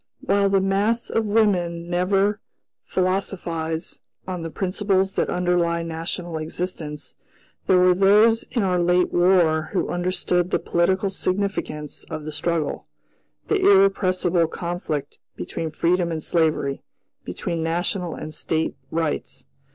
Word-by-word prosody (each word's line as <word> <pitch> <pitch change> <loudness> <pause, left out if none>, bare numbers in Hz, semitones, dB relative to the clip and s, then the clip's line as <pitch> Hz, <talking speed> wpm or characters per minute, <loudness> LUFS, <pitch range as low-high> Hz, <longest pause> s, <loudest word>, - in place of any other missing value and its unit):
While 200 0 +2
the 195 -1 +3
mass 205 +5 0
of 225 -1 0
women 175 -6 +1
never 195 +4 +1 0.5
philosophize 175 -3 -2 0.3
on 180 -2 -4
the 165 - -4
principles 190 +1 0
that - - 0
underlie 175 -1 +1
national 165 0 -4
existence, 155 -2 -5 0.5
there 185 - +5
were 180 0 +5
those 210 +5 +5
in 235 -4 0
our 180 -2 +1
late 180 +1 +2
War 175 -3 +3
who 190 - 0
understood 180 0 0
the - - +2
political 180 +3 +1
significance 185 -6 -2
of 155 -1 -6
the 155 - -4
struggle; 165 -2 -2 0.6
the 415 -2 +1
"irrepressible 185 -3 +3
conflict" 165 -4 -4 0.2
between 160 - -4
freedom 170 +2 +1
and 160 -2 -3
slavery, 155 -5 0 0.4
between 165 - -4
National 175 +1 -1
and 155 - -7
State 160 +1 -1
rights. 160 -2 -3
180 Hz, 125 wpm, -23 LUFS, 165-195 Hz, 0.6 s, there